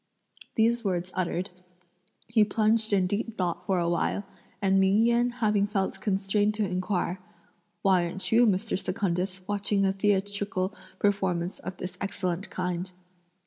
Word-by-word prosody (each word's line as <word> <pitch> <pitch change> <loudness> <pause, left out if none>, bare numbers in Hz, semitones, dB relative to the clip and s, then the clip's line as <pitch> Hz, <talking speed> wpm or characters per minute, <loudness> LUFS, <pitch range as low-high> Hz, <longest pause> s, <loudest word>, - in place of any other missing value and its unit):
These 230 +1 +3
words 185 -2 -1
uttered, 180 +1 -2 0.8
he 225 -1 +4
plunged 215 +1 +2
in 195 -2 +3
deep 210 +4 -2
thought 175 -3 -1
for 190 - +2
a 170 -1 +1
while, 175 +4 0 0.4
and 195 -1 +3
Ming 190 +1 +4
Yen 235 +1 +3
having 215 -4 +1
felt 195 -2 -1
constrained 205 +1 +1
to 210 -2 0
inquire: 185 0 -1 0.6
"Why 185 -3 +4
aren't 190 +3 -4
you, 235 +1 +6
Mr. 200 0 0
Secundus, 185 0 -1
watching 200 -1 +1
a 190 - +2
theatrical 200 -1 0 0.2
performance 190 -3 0
of 190 -1 -7
this 185 - -6
excellent 190 -1 -2
kind?" 180 0 -3
195 Hz, 145 wpm, -28 LUFS, 185-210 Hz, 0.8 s, you